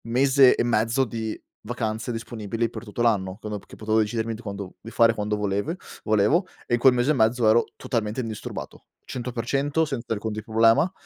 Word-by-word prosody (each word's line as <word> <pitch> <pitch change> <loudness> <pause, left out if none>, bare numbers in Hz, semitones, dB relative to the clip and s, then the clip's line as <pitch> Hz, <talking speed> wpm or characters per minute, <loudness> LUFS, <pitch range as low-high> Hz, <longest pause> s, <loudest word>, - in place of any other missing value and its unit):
Mese 130 +2 +5
e - - +1
mezzo 115 +2 +2
di 110 -2 -4 0.2
vacanze 110 0 -3
disponibili 115 0 -3
per 110 -2 -7
tutto 120 +1 -3
l'anno, 100 -5 +1
come 105 -2 -5
p - - -21
che - - -12
potevo 110 0 +1
decidermi 110 +1 -1
di 110 - -8
quando 100 -4 -6
di 115 - -9
fare 115 0 +4
quando 105 -1 -2
volevue 105 - -1 0.3
volevo 110 - +3 0.2
e - - -3
in 120 - +3
quel 130 +1 +6
mese 125 +4 +2
e - - +4
mezzo 115 -2 +2
ero 110 +2 +5
totalmente 110 -1 -2
indisturbato, 110 -3 -7 0.2
100% 135 +5 -1
senza 130 -6 -3
alcun 110 +1 -3
di 110 +1 -4
problema. 115 - +3
115 Hz, 190 wpm, -25 LUFS, 110-120 Hz, 0.3 s, quel